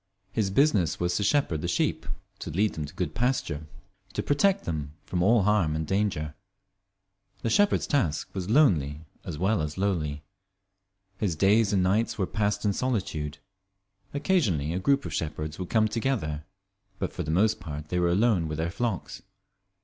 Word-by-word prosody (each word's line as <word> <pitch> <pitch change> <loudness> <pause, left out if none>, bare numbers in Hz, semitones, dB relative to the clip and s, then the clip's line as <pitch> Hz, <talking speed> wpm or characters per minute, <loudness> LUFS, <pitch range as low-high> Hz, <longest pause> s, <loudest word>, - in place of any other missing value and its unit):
His 105 -1 0
business 100 - +2
was 90 0 0
to 105 - 0
shepherd 100 - +1
the 85 - -2
sheep, 85 - 0 0.3
to - - -5
lead 100 +7 +1
them 75 - -4
to 75 - -10
good 85 -4 -2
pasture, 100 - -1 0.5
to - - -2
protect 195 +7 +2
them 75 -3 -3
from 90 - -1
all 110 +3 +4
harm 95 -7 +2
and 80 0 -2
danger. 95 -5 -1 1.1
The 115 - 0
shepherd's 205 - +3
task 115 - 0
was 95 -1 -4
lonely 80 - +3 0.2
as - - -5
well 95 +2 +1
as 75 +2 -4
lowly. 80 -7 -1 1.0
His 95 -6 0
days 100 +5 +4
and 95 -3 +3
nights 105 +5 +1
were 95 - +1
passed 105 +3 -1
in 100 - +3
solitude. 90 - -2 0.7
Occasionally 110 - +1
a 90 - -1
group 140 +8 +2
of - - -5
shepherds 75 0 -3
would 90 - -4
come 110 -1 +3
together, 105 - -2 0.5
but - - -3
for - - -4
the 75 - -4
most 105 +7 +3
part 75 -3 -7
they 90 - 0
were 85 0 +3
alone 95 -2 +3
with 75 0 -4
their 80 +1 -1
flocks. 110 -3 -3
95 Hz, 170 wpm, -27 LUFS, 80-110 Hz, 1.1 s, all